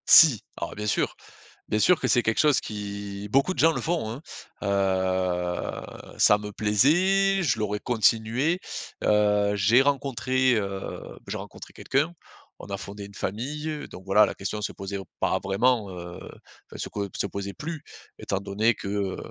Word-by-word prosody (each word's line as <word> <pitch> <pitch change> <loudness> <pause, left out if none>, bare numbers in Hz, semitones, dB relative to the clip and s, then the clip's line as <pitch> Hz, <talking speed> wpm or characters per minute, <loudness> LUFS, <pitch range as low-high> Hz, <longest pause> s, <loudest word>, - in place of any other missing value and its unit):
Si, 145 - +8 0.2
alors - - -5
bien 105 0 -4
sûr, - - 0 0.5
bien 105 - +1
sûr 175 +10 +5
que - - -1
c'est 120 - +3
quelque 115 -1 0
chose 150 -2 +4
qui, 100 -1 -6
beaucoup 140 - +3
de - - -14
gens 165 +1 +5
le 135 - -3
font, 160 -5 -1
hein. 120 +5 -6 0.4
Heu, 95 -3 -1
ça 105 - +6
me 105 0 -7
plaisait, 185 - +3
je 130 -9 +1
l'aurais 105 -1 -1
continué. 120 - +2 0.4
Heu, 105 -1 +3
j'ai 105 +6 +5
rencontré, 130 -2 +1
heu, 100 -2 -3 0.3
j'ai - - -4
rencontré - - -10
quelqu'un, 145 +5 0 0.5
on - - -10
a 100 - -4
fondé 100 +2 -8
une 100 - -15
famille. 150 +11 -4
Donc 95 - -11
voilà, 100 +2 +5
la - - -4
question 100 +2 -4
se 105 - -3
posait 95 0 -5 0.2
pas - - +1
vraiment, 105 +2 +1
heu, 85 -1 -8
enfin, - - -14
se - - -4
po 100 -1 -3
se - - -1
posait 100 0 -5
plus 160 0 -6 0.4
étant 100 - -2
donné 105 +4 +1
que 100 - -7
heu 100 -1 -1
105 Hz, 170 wpm, -26 LUFS, 100-135 Hz, 0.5 s, Si